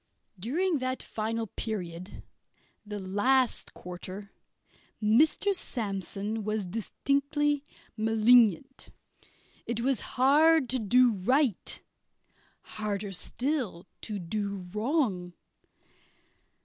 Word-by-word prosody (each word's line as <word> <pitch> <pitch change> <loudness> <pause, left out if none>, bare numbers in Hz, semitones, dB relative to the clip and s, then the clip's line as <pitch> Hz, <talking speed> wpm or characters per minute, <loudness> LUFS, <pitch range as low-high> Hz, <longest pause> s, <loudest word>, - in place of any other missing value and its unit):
During 315 - 0
that 255 0 -2
final 225 +1 -2
period, 185 -5 -6 0.6
the 210 -1 -6
last 205 +7 +1
quarter, 185 +3 -8 0.7
Mr. 290 - +3
Sandsome 210 - -3
was 215 -1 -1
distinctly 280 - 0 0.3
malignant. 225 +2 +3 0.8
It 235 0 -1
was 260 -2 +1 0.2
hard 290 +2 +5
to 255 - 0
do 245 +3 +5
right; 235 - 0 0.8
harder 205 -1 -3
still 235 - -2 0.2
to 210 -2 -4
do 200 +1 -3
wrong. 210 - 0
225 Hz, 85 wpm, -29 LUFS, 200-265 Hz, 0.8 s, hard